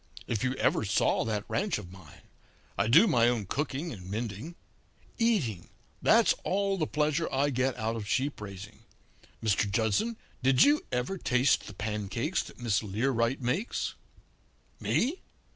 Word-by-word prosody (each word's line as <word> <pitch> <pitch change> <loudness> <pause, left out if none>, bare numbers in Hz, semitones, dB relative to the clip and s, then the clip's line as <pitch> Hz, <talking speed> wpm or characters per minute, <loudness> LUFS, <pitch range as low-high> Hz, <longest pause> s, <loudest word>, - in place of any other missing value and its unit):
If 115 -1 -2
you 130 0 0
ever 110 - +1
saw 105 0 +2
that 105 -2 -2
ranch 205 -2 0
of 90 -4 -9
mine! 90 -6 -15 0.5
I 100 - +1
do 160 - +7
my 120 - +4
own 115 -4 -1
cooking 145 - -3
and 95 -4 -10
mending. 115 - -4 0.6
Eating 160 - +1 0.3
that's - - +5
all 195 +1 0
the 155 - 0
pleasure 150 +1 0
I 140 +2 +1
get 130 0 0
out 110 0 -1
of 110 -3 -5
sheep 135 +3 -1
raising. 105 +1 -9 0.6
Mr. 105 -1 +2
Judson, 110 - 0 0.2
did 130 0 +5
you 295 +1 +4
ever 125 +10 -2
taste 125 -1 +2
the 105 - -9
pancakes 110 - -2
that - - -12
Miss 115 -5 +1
Learight 115 +4 0
makes?' 155 - -1 0.9
"'Me? 290 +10 0
120 Hz, 150 wpm, -29 LUFS, 105-150 Hz, 0.9 s, do